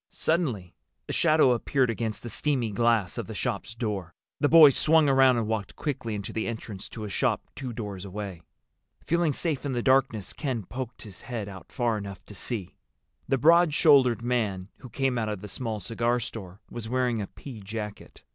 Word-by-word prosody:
Suddenly 130 - -1 0.3
a - - -3
shadow 155 -5 +4
appeared 125 +1 +1
against 110 -1 -4
the 120 - -5
steamy 130 -4 0
glass 110 -5 +1
of - - -4
the - - -7
shop's 115 - -3
door. 100 -8 -4 0.2
The 145 - +3
boys 155 -5 +9
swung 160 -1 +4
around 135 -2 +5
and 115 - 0
walked 105 -2 -3
quickly 120 -7 -3
into 100 0 -5
the 110 - -2
entrance 110 -4 -6
to 110 - -7
a - - -4
shop - - 0
two 130 -3 -5
doors 105 -5 -6
away. 100 -3 -6 0.6
Feeling 170 -1 +2
safe 145 -1 -1
in 140 -2 -2
the 120 -1 -1
darkness, 130 -6 +2
Ken 130 -7 -3
poked 125 +3 -6
his 100 -4 -10
head 115 -5 -5
out 95 -2 -10
far 120 -4 0
enough 100 -2 -8
to - - -10
see. 100 -2 -5 0.5
The 135 - +2
broad 165 +3 +5
shouldered 130 -9 +5
man 105 -6 -1
who 130 - -11
came 130 +1 0
out 110 -1 -1
of 105 -3 -4
the 105 - -7
small 110 +1 -4
cigar 115 +4 0
store 105 -5 -7
was 115 -2 -6
wearing 125 -3 +1
a 100 - -4
pea 125 -7 -10
jacket. 105 +1 -7
115 Hz, 195 wpm, -27 LUFS, 105-135 Hz, 0.6 s, boys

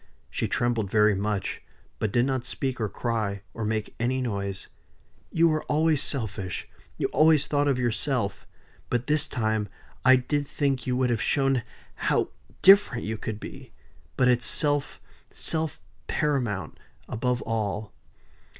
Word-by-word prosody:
She - - -1
trembled 120 -4 0
very 105 +1 +4
much; 100 0 -2 0.4
but 110 - -1
did 120 +3 +3
not 130 -2 -1
speak 130 0 -3
or 110 - 0
cry, 105 -2 -2
or 115 - -4
make 110 0 -2
any 125 +3 0
noise. 100 -5 -3 0.6
"You 165 +1 +4
were 155 -1 +1
always 155 -1 +2
selfish. 105 - -3 0.3
You - - -1
always 155 -2 +4
thought 145 -1 +1
of 135 -3 +2
yourself. 120 -3 -1 0.4
But 120 0 0
this 150 +1 +2
time 110 -4 -1 0.3
I 130 0 +8
did 145 +3 -1
think 135 -4 -1
you 125 0 +1
would 125 -1 +2
have 115 -4 0
shown 135 -3 +2 0.3
how - - 0 0.3
different 195 - +6
you 110 +1 -3
could 110 -2 -4
be. - - -10 0.4
But 125 - +4
it's 125 -1 +3
self 145 -2 +1 0.3
self 160 -2 0 0.3
paramount 135 - -1 0.3
above 125 +1 -1
all." 110 -1 -2
120 Hz, 145 wpm, -26 LUFS, 110-140 Hz, 0.6 s, I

